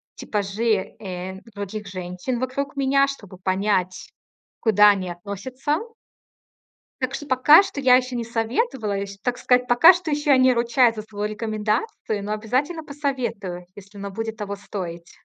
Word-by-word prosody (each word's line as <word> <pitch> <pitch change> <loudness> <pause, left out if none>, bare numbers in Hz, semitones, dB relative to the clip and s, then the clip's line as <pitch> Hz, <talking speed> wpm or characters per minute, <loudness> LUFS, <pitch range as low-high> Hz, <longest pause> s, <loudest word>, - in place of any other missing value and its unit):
типажи, 205 0 -1
э, 190 -1 -6
других 205 +1 -6
женщин 185 +6 -4
вокруг 270 +3 -3
меня, 275 0 +3
чтобы 205 -9 -8
понять, 185 0 -1 0.5
куда 210 -2 +6
они 190 -3 -2
относятся. 205 - -3 1.2
Так 260 +1 -1
что 290 - -6
пока 290 +6 +7
что 385 -8 -5
я 255 -2 +6
ещё 255 0 0
не 240 - -2
советовала, 230 - -1
ещ 200 0 -5
так 245 0 -1
сказать, 250 0 +2
пока 245 +9 +8
что 350 -3 -4
ещё 295 0 +1
я 270 - +7
не 255 0 +5
ручаюсь 235 0 +3
за 215 - -4
свою 210 -1 -5
рекомендацию, 215 - -2
но 205 - -4
обязательно 260 +10 -1
посоветую, 255 -11 -4
если 205 0 -13
оно 200 0 -5
будет 225 +2 -4
того 200 -2 -4
стоить. 175 -4 -7
225 Hz, 155 wpm, -23 LUFS, 200-260 Hz, 1.2 s, пока